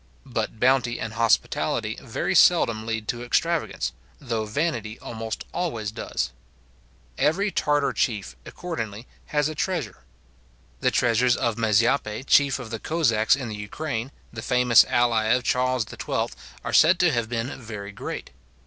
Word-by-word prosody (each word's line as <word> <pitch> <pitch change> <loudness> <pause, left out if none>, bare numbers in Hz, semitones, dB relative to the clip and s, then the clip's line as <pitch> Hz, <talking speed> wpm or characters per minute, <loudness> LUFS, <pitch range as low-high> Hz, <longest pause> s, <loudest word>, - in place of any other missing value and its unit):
But 110 - -3
bounty 125 -1 +2
and 110 -1 -4
hospitality 115 0 +1
very - - -2
seldom 110 -1 +4
lead 115 -1 -3
to 120 -2 -2
extravagance; 165 +7 0 0.3
though 115 -5 -3
vanity 115 -4 -2
almost 110 -1 -6
always 115 -13 -2
does. 110 - -3 0.9
Every 195 +7 +2
Tartar 145 -4 +1
chief, 100 - -1
accordingly, 115 - -6 0.2
has 150 -1 +1
a 155 - -4
treasure. 155 - -3 0.8
The - - +2
treasures 120 +1 +2
of 115 -2 0
Mazepa, 110 +1 +1
chief 140 0 +4
of 125 -4 -8
the 115 - -4
Cossacks 120 -10 +2
in 135 -3 -5
the 110 - -5
Ukraine, 115 +4 -4 0.2
the 110 - -6
famous 125 -1 +5
ally 120 -2 +2
of 125 +3 +2
Charles 125 -2 +1
XII., - - -2 0.3
are - - -4
said 170 +3 +6
to 175 -2 +3
have 120 -4 -1
been 120 +3 -3
very 105 -3 -7
great. - - -6
120 Hz, 145 wpm, -25 LUFS, 110-140 Hz, 0.9 s, said